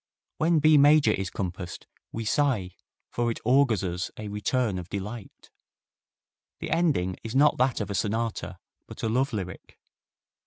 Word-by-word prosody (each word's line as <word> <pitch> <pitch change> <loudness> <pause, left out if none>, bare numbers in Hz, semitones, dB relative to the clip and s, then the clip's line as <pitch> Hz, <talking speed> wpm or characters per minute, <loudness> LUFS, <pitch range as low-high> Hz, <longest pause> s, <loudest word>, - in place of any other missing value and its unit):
When 165 +1 +3
B 155 0 +5
major 145 +1 +6
is 95 -1 -2
compassed 90 -1 -5 0.3
we 115 0 -5
sigh, 110 -7 +1 0.4
for 120 0 0
it 115 - -3
augurs 125 -4 +3
us 90 0 -3
a 105 -1 -6
return 105 0 -1
of 90 0 -9
delight. 100 +2 -7 1.1
The - - -5
ending 150 - +1
is 115 +2 -6
not 145 +2 +4
that 130 -1 +2
of 105 -2 -3
a - - -2
sonata, 110 +3 -2 0.3
but - - -10
a 110 - +1
love 130 +4 +1
lyric. 95 -5 -6
115 Hz, 155 wpm, -26 LUFS, 95-135 Hz, 1.1 s, major